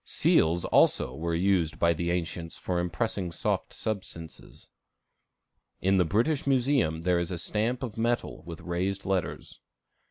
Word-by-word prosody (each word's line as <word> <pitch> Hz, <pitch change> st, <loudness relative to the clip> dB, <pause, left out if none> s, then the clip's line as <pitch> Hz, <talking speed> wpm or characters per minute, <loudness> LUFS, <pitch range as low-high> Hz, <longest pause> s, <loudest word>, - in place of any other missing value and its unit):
Seals, 85 Hz, +2 st, +3 dB
also, 65 Hz, -, +3 dB
were 85 Hz, +4 st, -2 dB
used 90 Hz, -2 st, +1 dB
by 85 Hz, 0 st, +3 dB
the 85 Hz, +1 st, -2 dB
ancients 85 Hz, -1 st, -3 dB
for 90 Hz, -1 st, -2 dB
impressing 90 Hz, +1 st, -2 dB
soft -, -, -2 dB
substances. 90 Hz, -6 st, -7 dB, 1.1 s
In 95 Hz, +1 st, +2 dB
the 90 Hz, -, +4 dB
British 125 Hz, -, +1 dB
Museum 125 Hz, -, +2 dB
there 90 Hz, -1 st, +2 dB
is 85 Hz, -1 st, -2 dB
a 90 Hz, -, -3 dB
stamp 110 Hz, +9 st, -1 dB
of 115 Hz, -3 st, -5 dB
metal 120 Hz, +1 st, -1 dB
with 85 Hz, -2 st, -7 dB
raised 95 Hz, +3 st, -2 dB
letters. 95 Hz, -5 st, -3 dB
90 Hz, 145 wpm, -28 LUFS, 85-105 Hz, 1.1 s, the